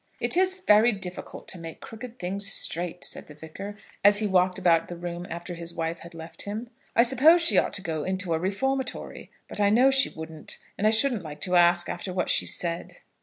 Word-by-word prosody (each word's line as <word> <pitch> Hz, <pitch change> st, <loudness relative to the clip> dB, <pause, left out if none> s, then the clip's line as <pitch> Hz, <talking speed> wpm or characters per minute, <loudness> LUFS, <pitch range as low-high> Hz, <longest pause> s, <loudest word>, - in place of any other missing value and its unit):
"It -, -, +1 dB
is 375 Hz, +1 st, +2 dB
very 215 Hz, +3 st, +5 dB
difficult 185 Hz, -2 st, -7 dB
to 185 Hz, -, -3 dB
make 165 Hz, -1 st, -9 dB
crooked 235 Hz, +2 st, -10 dB
things 200 Hz, +1 st, -1 dB
straight," 175 Hz, -7 st, -2 dB
said 140 Hz, -, -4 dB
the 150 Hz, -, -13 dB
Vicar, 195 Hz, +7 st, -9 dB, 0.3 s
as 205 Hz, +1 st, +6 dB
he 215 Hz, -, 0 dB
walked 185 Hz, -1 st, +2 dB
about 170 Hz, -3 st, +3 dB
the 175 Hz, -, -7 dB
room 175 Hz, 0 st, -6 dB
after 170 Hz, +1 st, -6 dB
his 170 Hz, 0 st, -7 dB
wife 165 Hz, 0 st, -3 dB
had 170 Hz, 0 st, -12 dB
left 165 Hz, 0 st, -9 dB
him. 220 Hz, +4 st, -6 dB, 0.2 s
"I 235 Hz, -, +6 dB
suppose 290 Hz, +8 st, +5 dB
she -, -, +6 dB
ought -, -, -1 dB
to 195 Hz, -, +1 dB
go 160 Hz, -4 st, -3 dB
into 185 Hz, -2 st, -2 dB
a 160 Hz, -, 0 dB
reformatory. 260 Hz, +8 st, -3 dB, 0.2 s
But -, -, -5 dB
I 205 Hz, -1 st, +4 dB
know 250 Hz, +6 st, +5 dB
she 270 Hz, 0 st, +4 dB
wouldn't; 160 Hz, -1 st, -6 dB, 0.2 s
and 210 Hz, -, +1 dB
I -, -, +6 dB
shouldn't 225 Hz, 0 st, +2 dB
like 150 Hz, -2 st, -9 dB
to 180 Hz, -1 st, 0 dB
ask 175 Hz, 0 st, +5 dB
her -, -, -3 dB
after 180 Hz, +2 st, -6 dB
what 180 Hz, -1 st, 0 dB
she -, -, +1 dB
said." 170 Hz, -1 st, -2 dB
185 Hz, 220 wpm, -26 LUFS, 170-220 Hz, 0.3 s, as